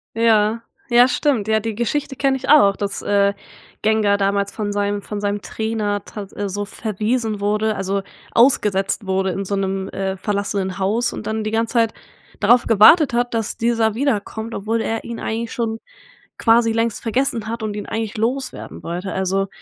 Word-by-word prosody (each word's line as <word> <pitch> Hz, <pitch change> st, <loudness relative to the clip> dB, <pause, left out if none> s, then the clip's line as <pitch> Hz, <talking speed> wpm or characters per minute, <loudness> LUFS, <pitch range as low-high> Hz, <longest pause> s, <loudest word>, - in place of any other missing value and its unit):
Ja, 225 Hz, -1 st, +3 dB, 0.3 s
ja, 240 Hz, +1 st, +6 dB
stimmt. 250 Hz, -4 st, 0 dB
Ja, 220 Hz, 0 st, +3 dB
die 220 Hz, 0 st, -4 dB
Geschichte 270 Hz, +5 st, -2 dB
kenne 270 Hz, 0 st, +1 dB
ich -, -, -7 dB
auch, 200 Hz, -10 st, +6 dB
dass, 200 Hz, -1 st, -3 dB
äh, 200 Hz, -1 st, +2 dB, 0.5 s
Gengar 215 Hz, -2 st, +2 dB
damals 200 Hz, 0 st, 0 dB
von 210 Hz, -2 st, -3 dB
seinem 205 Hz, 0 st, -1 dB
von 210 Hz, -1 st, -5 dB
seinem 205 Hz, 0 st, -1 dB
Trainer 215 Hz, -2 st, -2 dB
tat 200 Hz, -2 st, -8 dB, 0.2 s
so 205 Hz, +1 st, -3 dB
verwiesen 215 Hz, +1 st, -2 dB
wurde, 210 Hz, +1 st, 0 dB
also, 195 Hz, 0 st, -1 dB, 0.3 s
ausgesetzt 210 Hz, -5 st, +2 dB
wurde 190 Hz, 0 st, 0 dB
in 195 Hz, +2 st, -3 dB
so 200 Hz, +1 st, -2 dB
'nem, 195 Hz, 0 st, -2 dB
äh, 190 Hz, 0 st, -3 dB
verlassenen 200 Hz, -1 st, -2 dB
Haus 220 Hz, +5 st, 0 dB
und 210 Hz, -, -6 dB
dann 220 Hz, 0 st, -2 dB
die 215 Hz, -, -3 dB
ganze 225 Hz, 0 st, 0 dB
Zeit 230 Hz, -2 st, +2 dB, 0.5 s
darauf 235 Hz, +4 st, +4 dB
gewartet 235 Hz, -, +6 dB
hat, 240 Hz, 0 st, 0 dB
dass 225 Hz, -2 st, -2 dB
dieser 225 Hz, -2 st, +1 dB
wiederkommt, 225 Hz, -3 st, -2 dB
obwohl 225 Hz, +3 st, -1 dB
er 225 Hz, 0 st, -2 dB
ihn 235 Hz, -1 st, -6 dB
eigentlich 225 Hz, +1 st, -3 dB
schon 225 Hz, -2 st, -2 dB, 0.6 s
quasi 230 Hz, 0 st, +4 dB
längst 230 Hz, -1 st, -1 dB
vergessen 235 Hz, -1 st, 0 dB
hat 230 Hz, 0 st, -4 dB
und 210 Hz, -1 st, -3 dB
ihn 205 Hz, -, -5 dB
eigentlich 225 Hz, +1 st, -3 dB
loswerden 255 Hz, +5 st, -3 dB
wollte, 175 Hz, +2 st, -4 dB
also 190 Hz, +1 st, 0 dB
215 Hz, 175 wpm, -20 LUFS, 200-230 Hz, 0.6 s, ja